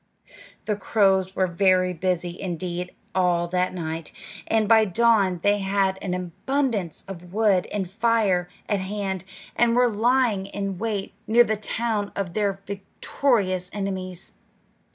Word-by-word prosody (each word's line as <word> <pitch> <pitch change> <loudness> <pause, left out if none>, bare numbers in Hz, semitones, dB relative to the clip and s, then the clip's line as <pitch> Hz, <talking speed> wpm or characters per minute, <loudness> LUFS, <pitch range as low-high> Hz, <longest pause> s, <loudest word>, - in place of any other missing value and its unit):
The 210 - 0
crows 190 -2 +2
were 190 - +2
very 185 0 +2
busy 180 0 -2
indeed 180 -1 -4 0.2
all 175 -2 +2
that 180 +1 +1
night, 165 -2 -5 0.4
and 220 -1 +2
by 220 0 +6
dawn 205 -3 +3
they 205 0 +3
had 195 -1 +1
an 180 -2 -2
abundance 195 - -2
of 180 -2 -9
wood 205 -3 +2
and 200 -3 -2
fire 205 -3 +1 0.2
at 205 -2 +1
hand, 190 -1 -3 0.3
and 235 -1 +3
were 245 0 +4
lying 225 -2 +2
in 195 -2 -4
wait 210 -3 -2
near 235 +3 +6
the 220 -1 0
town 215 -1 -2
of 185 -4 -3
their 200 -2 -1
victorious 195 -1 -1
enemies. 190 -3 -5
195 Hz, 135 wpm, -24 LUFS, 180-215 Hz, 0.4 s, by